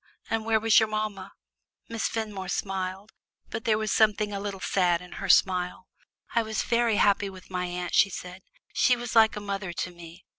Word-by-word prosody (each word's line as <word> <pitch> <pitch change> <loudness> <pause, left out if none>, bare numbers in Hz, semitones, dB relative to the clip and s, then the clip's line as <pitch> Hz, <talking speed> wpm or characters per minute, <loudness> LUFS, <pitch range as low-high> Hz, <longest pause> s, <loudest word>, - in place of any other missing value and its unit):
And 225 -1 0
where 225 -1 +3
was 225 0 +5
your 220 -1 +1
mamma?" 215 -3 -3 0.6
Miss 230 -1 -2
Fenmore 210 -5 -4
smiled, 190 +2 -3 0.4
but 220 - -5
there 215 -2 +3
was 215 -1 -2
something 210 -1 +2
a 200 - -3
little 200 -1 -5
sad 180 -3 +1
in 180 0 -13
her 195 - -4
smile. 180 0 +2 0.5
"I 235 - +3
was 220 -1 -2
very 235 -2 +2
happy 200 -1 +3
with 190 -1 -13
my 180 0 -2
aunt," 180 0 -4
she 200 - +5
said; 180 0 -8 0.3
"she 250 - +4
was 240 -1 -6
like 220 -1 +6
a - - -4
mother 200 -3 -4
to 180 - -3
me. 170 +1 -13
200 Hz, 195 wpm, -27 LUFS, 185-220 Hz, 0.6 s, like